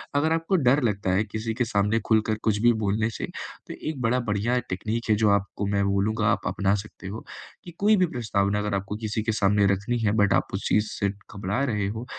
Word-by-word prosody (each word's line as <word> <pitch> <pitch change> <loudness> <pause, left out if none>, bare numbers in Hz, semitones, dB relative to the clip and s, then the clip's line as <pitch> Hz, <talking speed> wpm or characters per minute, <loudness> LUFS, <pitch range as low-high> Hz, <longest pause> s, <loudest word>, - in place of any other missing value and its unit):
अगर 150 +3 +2
आपको 165 +4 0
डर 135 -1 +3
लगता 100 -4 0
है 95 +3 +2
किसी 110 +1 -4
के 125 0 +1
सामने 105 0 +1
खुलकर 110 -1 +2
कुछ 110 -2 +2
भी 120 +1 +6
बोलने 110 +2 +1
से, - - -4 0.4
तो - - -6 0.2
एक 145 -5 -5
बड़ा 125 +1 +2
बढ़िया 115 +2 0
टेक्नीक 110 +5 -2
है 110 - +5
जो 110 0 +3
आपको 100 0 0
मैं 100 0 +1
बोलूँगा 100 +2 +1
आप - - -1
अपना 100 0 +1
सकते 100 -2 -8
हो, 110 +4 -6 0.4
कि 175 - -9
कोई 210 +2 +5
भी 185 - +4
प्रस्तावना 105 - 0
अगर 105 0 -2
आपको 100 +1 -3
किसी 110 0 -1
के 110 - 0
सामने 100 -1 +3
रखनी 100 +5 -2
है 110 -2 +1
बट 100 - +3
आप - - +2
उस 95 - -2
चीज़ 105 0 +2
से 100 - -1
घबरा 100 +3 -4
रहे 105 -2 -1
हो, 110 +4 -5
105 Hz, 225 wpm, -25 LUFS, 100-115 Hz, 0.4 s, भी